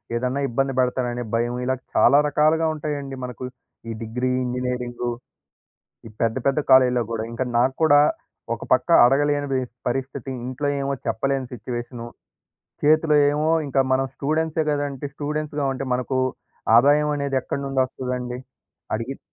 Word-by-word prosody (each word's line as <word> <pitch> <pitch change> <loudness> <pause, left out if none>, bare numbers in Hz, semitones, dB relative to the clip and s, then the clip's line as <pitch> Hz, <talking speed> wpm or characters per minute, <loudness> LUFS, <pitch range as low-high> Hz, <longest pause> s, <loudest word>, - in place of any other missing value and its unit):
ఏదన్నా 125 +3 -1
ఇబ్బంది 135 +3 0
బెడతాడనే 125 -1 0
భయము 120 +1 0
ఇలా 130 +1 +1 0.2
చాలా 140 - +6
రకాలుగా 155 +2 +2
ఉంటాయండి 145 -3 -4
మనకు. 125 0 -6 0.5
ఈ - - -2
డిగ్రీ, 125 +3 -2
ఇంజినీరింగు 125 -1 -3 1.0
ఈ - - -10
పెద్ద 115 +1 +1
పెద్ద 140 +2 +2
కాలేజీల్లో 130 -2 +6
గూడా 110 -1 -2
ఇంకా 115 +2 -2
నాకు 130 +2 +2
కూడా 145 -2 +6 0.5
ఒకపక్క - - 0 0.2
అడగలేని 145 +2 +2
బీస్ 130 -2 -2
పరిస్థితి. 135 +1 -3 0.2
ఇంట్లో 130 +3 -3
ఏమో 140 0 -1
చెప్పలేని 135 -2 -1
సిట్యుయేషను. 120 0 -6 0.8
చేతిలో 155 0 +4
ఏమో 150 +2 +1 0.2
ఇంకా 135 0 +2
మనం 135 +1 +2
స్టూడెంట్సే 160 +2 0
గదా! 145 0 0
అంటే 135 +1 -7
స్టూడెంట్స్‌గా 150 0 -3
ఉంటే 135 +1 -4
మనకు 130 +1 -1 0.6
ఆదాయం 145 +5 +5
అనేది 140 -1 -2
ఎక్కడి 140 - -4
నుండొస్తదండి? 130 -2 -2 0.6
అడిగిద 115 +5 -3
135 Hz, 135 wpm, -23 LUFS, 125-145 Hz, 1.0 s, చాలా